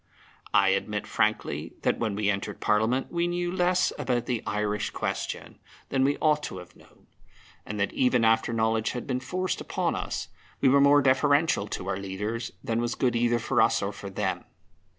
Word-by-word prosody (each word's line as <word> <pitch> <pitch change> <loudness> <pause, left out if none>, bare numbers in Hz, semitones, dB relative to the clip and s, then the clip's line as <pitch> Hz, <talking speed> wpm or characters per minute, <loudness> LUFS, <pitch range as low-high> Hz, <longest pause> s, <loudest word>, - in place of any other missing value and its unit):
I - - +4
admit - - -1
frankly - - -1
that - - +1
when 110 -4 -1
we 105 0 -1
entered 100 0 -4
Parliament 110 +5 +1
we 170 0 0
knew 175 0 -1
less 180 0 +2
about 120 -2 0
the 120 -3 -1
Irish 105 0 -1
question - - -4 0.3
than 135 -1 +1
we 140 +2 +2
ought 150 -1 +2
to - - -6
have 90 -1 -11
known, - - -22 0.6
and 105 0 -4
that 100 - 0
even 125 -2 +3
after 110 +1 +3
knowledge 110 -1 +1
had 125 - -5
been 125 -1 -1
forced 185 +7 -2
upon - - -1
us, - - -4 0.3
we 135 - +4
were 140 +1 +5
more 145 0 +6
deferential 140 -3 +3
to - - -5
our 95 - -1
leaders 105 +4 -4
than 115 0 -1
was 120 0 -1
good 125 -2 +1
either 120 0 +2
for 115 - +1
us 115 - +3
or 100 - -1
for 100 0 -8
them. 95 - -2
120 Hz, 190 wpm, -27 LUFS, 105-140 Hz, 0.6 s, more